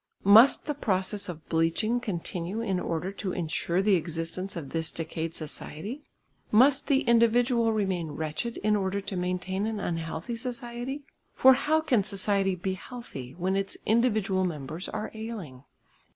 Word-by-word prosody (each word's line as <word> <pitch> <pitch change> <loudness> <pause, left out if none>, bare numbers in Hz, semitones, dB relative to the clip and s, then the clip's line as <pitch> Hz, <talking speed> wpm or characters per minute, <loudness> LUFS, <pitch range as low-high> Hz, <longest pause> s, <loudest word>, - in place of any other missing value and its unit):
Must 220 +7 +7
the 295 - -1
process 200 -5 0
of 160 -3 -8
bleaching 165 +9 +1
continue 185 -2 -4
in 195 -5 -1
order 170 +2 -2
to 195 -2 -4
insure 175 +2 -1
the 205 0 +4
existence 165 +2 -2
of 150 -6 -6
this 165 -1 -1
decayed 165 0 -4
society? 160 - -6 0.5
Must 265 +5 +5
the 275 -2 +3
individual 235 0 +3
remain 190 -7 -1
wretched 160 +10 -3
in 210 0 +3
order 195 0 0
to 200 0 -5
maintain 180 +3 -1
an 220 -2 -3
unhealthy 165 +4 -3
society? 245 +3 -5 0.3
For 265 0 +8
how 310 +4 +2
can 255 -10 +2
society 195 -1 +1
be 185 +2 -2
healthy 185 - -8
when 185 +2 -1
its 195 0 -2
individual 215 -4 +2
members 160 0 -4
are 215 0 -4
ailing? 205 - -7
195 Hz, 150 wpm, -28 LUFS, 170-230 Hz, 0.5 s, For